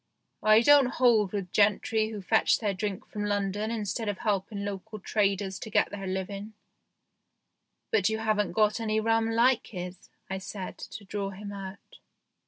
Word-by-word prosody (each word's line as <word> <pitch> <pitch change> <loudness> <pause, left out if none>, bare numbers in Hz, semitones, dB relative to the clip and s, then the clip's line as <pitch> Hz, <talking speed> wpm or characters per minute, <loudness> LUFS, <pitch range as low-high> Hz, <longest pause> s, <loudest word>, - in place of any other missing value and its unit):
I 215 +1 +6
don't 285 +1 +6
hold 225 -6 +4
with 195 -4 -4
gentrice 215 +1 +2
who 210 -3 -7
fetch 220 +4 +3
their 210 -3 -1
drink 195 0 -4
from 210 - -5
London 205 +1 -1
instead 220 0 -2
of 205 - -2
helping 200 -1 -2
local 205 +2 -6
traders 200 -2 0
to - - -7
get - - +2
their 195 -1 -5
living." 195 +3 -4 0.7
" - - -53
But 205 -2 +3
you 220 - -1
haven't 215 -4 0
got 210 +3 +2
any 220 -1 0
rum 225 +1 +2
like 235 +2 +3
his," 180 -1 -8 0.2
I 190 0 -4
said, 190 0 -7
to 205 - -9
draw 200 0 -3
him 200 +1 -8
out. 195 -1 -9
205 Hz, 170 wpm, -28 LUFS, 195-220 Hz, 0.7 s, I